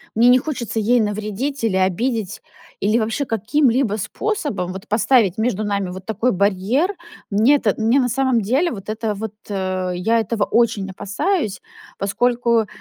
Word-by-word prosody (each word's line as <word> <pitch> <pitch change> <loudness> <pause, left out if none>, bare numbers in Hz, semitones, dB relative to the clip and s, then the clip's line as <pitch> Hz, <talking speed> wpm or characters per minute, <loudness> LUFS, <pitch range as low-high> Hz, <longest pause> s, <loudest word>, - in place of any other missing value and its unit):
Мне 235 +2 +5
не 255 +1 +6
хочется 245 -7 -3
ей 235 +3 +3
навредить 215 +6 -3
или 220 -4 +1
обидеть, 200 +3 -1 0.4
или 215 +4 +2
вообще 225 +6 -1
каким-либо 235 0 +1
способом 285 - -3
вот 190 +3 -9
поставить 215 -3 +3
между 220 -2 0
нами 200 -3 -1
вот 185 +1 -8
такой 220 +3 0
барьер. 205 - +1 0.4
Мне 225 +8 +4
это 220 -8 +1
мне 230 +5 +3
на 250 -1 +1
самом 260 -2 +1
деле 265 - +1
вот 205 -2 -8
это 215 -1 -2
вот 220 +1 -5 0.2
э, 185 -2 -2
я 225 +6 +1
этого 220 -1 -1
очень 220 -4 +1
опасаюсь, 205 - -2 0.4
поскольку, 235 +2 +1
220 Hz, 155 wpm, -20 LUFS, 200-245 Hz, 0.4 s, не